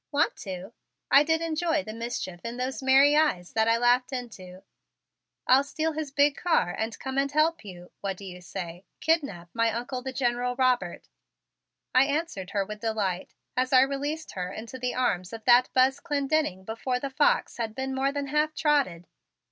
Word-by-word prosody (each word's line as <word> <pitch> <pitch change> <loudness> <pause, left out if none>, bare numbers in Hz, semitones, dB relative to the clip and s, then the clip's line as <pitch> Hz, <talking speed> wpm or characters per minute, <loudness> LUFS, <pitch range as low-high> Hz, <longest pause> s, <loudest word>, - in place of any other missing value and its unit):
Want 295 0 +2
to?" 190 +2 -7 0.4
I 280 - +8
did 320 +2 +1
enjoy 325 -1 0
the 215 - -7
mischief 225 -6 -5
in 235 +1 -5
those 260 +3 -3
merry 270 +2 +5
eyes 295 - +1
that 220 0 +2
I 230 0 +4
laughed 245 +2 +3
into. 195 -8 -7 0.8
"I'll 265 +2 +5
steal 310 +3 -2
his 310 -1 -4
big 285 0 +3
car 325 - +1
and 220 -1 -3
come 265 0 -3
and 280 0 0
help 310 +1 +2
you 180 -3 -11
what 195 -2 -3
do 200 - -10
you 180 -1 -9
say? 175 -1 -7 0.2
kidnap 280 - 0
my 230 -1 +2
Uncle, 245 +3 -4
the 265 +1 -5
General 245 -1 -1
Robert," 250 -9 0 0.9
I 255 +1 +6
answered 285 - -2
her 200 -2 -1
with 210 +1 -8
delight 205 -5 -2 0.2
as 255 0 0
I 255 -1 +7
released 285 +4 -2
her 180 -1 -4
into 230 +4 -8
the 250 0 -2
arms 195 -7 -1
of 225 -1 -7
that 245 0 +6
Buzz 260 +1 +4
Clendenning 285 - -1
before 250 +4 -2
the 275 +1 -4
fox 290 +3 +2
had 225 -2 -3
been 265 0 -3
more 270 +1 +1
than 285 0 -3
half 300 +2 +1
trotted. 275 - +1
250 Hz, 185 wpm, -27 LUFS, 210-285 Hz, 0.9 s, I